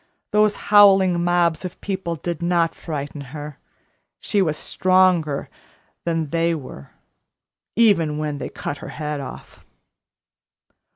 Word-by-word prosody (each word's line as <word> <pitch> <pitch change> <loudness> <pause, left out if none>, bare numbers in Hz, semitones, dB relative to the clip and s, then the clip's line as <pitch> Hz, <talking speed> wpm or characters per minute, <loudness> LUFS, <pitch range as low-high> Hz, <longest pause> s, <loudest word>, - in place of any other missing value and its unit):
Those 210 0 +3
howling 195 -4 +5
mobs 175 -1 +1
of 185 -1 -7
people 190 -4 -3
did 170 +1 -5
not 170 -1 +1
frighten 145 -2 -6 0.2
her. 150 -1 -8 0.6
She 205 - +1
was 155 -5 0
stronger 185 -6 +2 0.6
than 165 -3 -1
they 165 0 +1
were 130 - -9 0.9
even 180 -10 +3
when 150 -2 -3
they - - -5
cut 145 - -6
her - - -8
head 150 -1 -4
off." - - -10
170 Hz, 120 wpm, -22 LUFS, 150-185 Hz, 0.9 s, howling